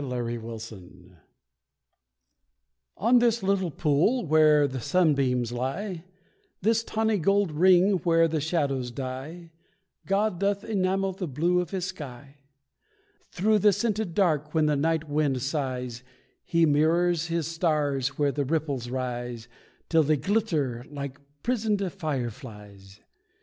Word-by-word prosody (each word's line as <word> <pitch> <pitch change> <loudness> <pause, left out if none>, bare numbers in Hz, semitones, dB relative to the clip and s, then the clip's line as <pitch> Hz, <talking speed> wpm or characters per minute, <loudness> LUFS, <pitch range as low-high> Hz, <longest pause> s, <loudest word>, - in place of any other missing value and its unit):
THE 140 - -5
LILY 120 -2 -3
POND 100 -6 -10 1.8
On 240 +4 +4
this 235 -2 +2
little 190 -2 +1
pool 160 - +1
where 155 -2 +5
the 130 -1 -5
sunbeams 135 -8 +1
lie, 160 - -4 0.5
This 225 +3 +1
tawny 220 -2 0
gold 195 +1 +2
ring 185 +4 +4
where 165 -1 +3
the 160 -1 -2
shadows 140 -6 -1
die, 135 +7 -7 0.6
God 195 -1 +1
doth 200 +1 0
enamel 195 -2 0
the 185 -1 -5
blue 170 +6 +1
of 180 - -2
His 185 -3 -3
sky. 140 -6 -9 0.9
Through 210 +4 +2
the 210 +1 +5
scented 210 -4 -2
dark 155 -5 +1
when 155 -1 +3
the 150 -1 +2
night 160 +2 0
wind 145 -3 0
sighs, 130 -4 -3 0.4
He 170 -1 +3
mirrors 165 +3 +2
His 170 -2 -1
stars 150 -5 -1
where 145 -1 +2
the 145 +1 -1
ripples 140 -4 -2
rise, 120 -2 -4 0.4
Till 165 -1 +4
they 155 0 +2
glitter 155 - -1
like 140 -2 -6 0.2
prisoned 210 -6 0
fireflies. 115 - -6
155 Hz, 130 wpm, -26 LUFS, 130-185 Hz, 1.8 s, where